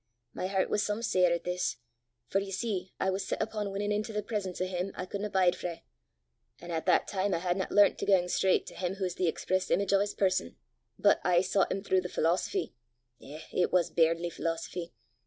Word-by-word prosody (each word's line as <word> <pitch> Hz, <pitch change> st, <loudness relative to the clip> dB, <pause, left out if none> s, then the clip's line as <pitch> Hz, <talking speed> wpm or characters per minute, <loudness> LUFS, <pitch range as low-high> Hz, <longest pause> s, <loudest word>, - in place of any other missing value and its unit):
My 185 Hz, -, -3 dB
hert 190 Hz, -1 st, +1 dB
was 210 Hz, -, +2 dB
some 210 Hz, +2 st, -2 dB
sair 180 Hz, -5 st, +3 dB
at 170 Hz, -, 0 dB
this, 180 Hz, 0 st, -1 dB, 0.5 s
for 195 Hz, -, +1 dB
ye 195 Hz, 0 st, -5 dB
see 190 Hz, -2 st, -3 dB
I 190 Hz, -, +1 dB
was 190 Hz, 0 st, -3 dB
set -, -, -2 dB
upo' 215 Hz, -2 st, -2 dB
winnin' 205 Hz, +1 st, -2 dB
intil 210 Hz, +1 st, -2 dB
the 210 Hz, -, -1 dB
presence 205 Hz, -4 st, -3 dB
o' 185 Hz, -, +1 dB
him 185 Hz, +1 st, -3 dB
I 180 Hz, -, -4 dB
couldna 200 Hz, +2 st, -4 dB
bide 185 Hz, -2 st, +3 dB
frae, 170 Hz, -2 st, -6 dB, 0.8 s
an' 175 Hz, 0 st, -8 dB
at 160 Hz, +1 st, -3 dB
that 180 Hz, -, +4 dB
time 195 Hz, -1 st, 0 dB
I -, -, +1 dB
hadna 180 Hz, +2 st, -1 dB
learnt 205 Hz, 0 st, +5 dB
to -, -, -3 dB
gang 190 Hz, -3 st, +5 dB
straucht 185 Hz, +1 st, +2 dB
to -, -, -9 dB
him 180 Hz, 0 st, -3 dB
wha's 185 Hz, -2 st, -1 dB
the 180 Hz, 0 st, 0 dB
express 185 Hz, +3 st, -1 dB
image 200 Hz, 0 st, +2 dB
o' 195 Hz, -, +5 dB
's 205 Hz, -, -5 dB
person, 185 Hz, -, 0 dB, 0.4 s
but, -, -, +4 dB
aye 175 Hz, -1 st, +4 dB
soucht 190 Hz, +1 st, +1 dB
him 195 Hz, +1 st, -2 dB
throuw 190 Hz, -2 st, +2 dB
the 180 Hz, -, -5 dB
philosophy 180 Hz, -, 0 dB, 0.5 s
eh, 150 Hz, +3 st, -9 dB
but -, -, -2 dB
it 180 Hz, -, +2 dB
was 180 Hz, -2 st, +2 dB
bairnly 165 Hz, +1 st, +2 dB
philosophy! 170 Hz, +1 st, -4 dB
185 Hz, 220 wpm, -30 LUFS, 175-200 Hz, 0.8 s, learnt